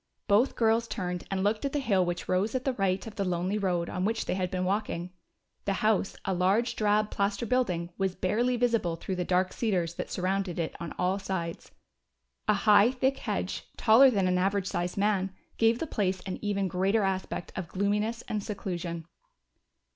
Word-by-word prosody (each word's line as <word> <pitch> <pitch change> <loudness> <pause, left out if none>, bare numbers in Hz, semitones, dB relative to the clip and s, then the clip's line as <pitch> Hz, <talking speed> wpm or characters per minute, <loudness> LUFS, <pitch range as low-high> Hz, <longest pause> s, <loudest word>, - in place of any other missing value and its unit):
Both 220 +5 +3
girls 230 0 +2
turned 180 -4 -4
and 190 -1 -1
looked 215 +1 +1
at 280 - -2
the 295 - +1
hill 205 -9 +2
which 175 -1 -3
rose 195 +6 +1
at 255 - -2
the 265 - +1
right 195 -4 0
of 225 - -9
the 200 - +1
lonely 185 +3 -1
road 175 -4 0
on 180 - -3
which 220 +3 0
they - - -1
had 185 -1 -1
been 185 0 -2
walking. 180 -3 -2 0.5
The 200 - +1
house, 215 -2 +2
a 190 - 0
large 195 +7 +2
drab 210 0 +2
plaster 200 +2 0
building, 185 -9 0
was 190 -1 0
barely 240 +6 +1
visible 230 -8 +1
through 185 +3 -4
the 180 - 0
dark 185 +1 +1
cedars 180 -7 0
that - - -4
surrounded 190 -1 -1
it 165 -2 -2
on 170 -2 -6
all 185 +2 +1
sides. 170 -4 -4 0.8
A 210 - +4
high, 210 +1 +7
thick 265 +1 0
hedge, - - -3
taller 245 +4 +7
than 195 -6 +1
an 180 0 +2
average 195 +1 +1
sized 180 -1 -2
man, 195 -2 +1 0.2
gave 225 0 +4
the 325 - -2
place 190 -9 -1
an 185 0 -5
even 200 -2 0
greater 195 +4 +1
aspect 190 -2 -2
of 185 -3 -4
gloominess 210 +5 -1
and 210 -2 -3
seclusion. 175 -5 -4
195 Hz, 190 wpm, -29 LUFS, 185-220 Hz, 0.8 s, high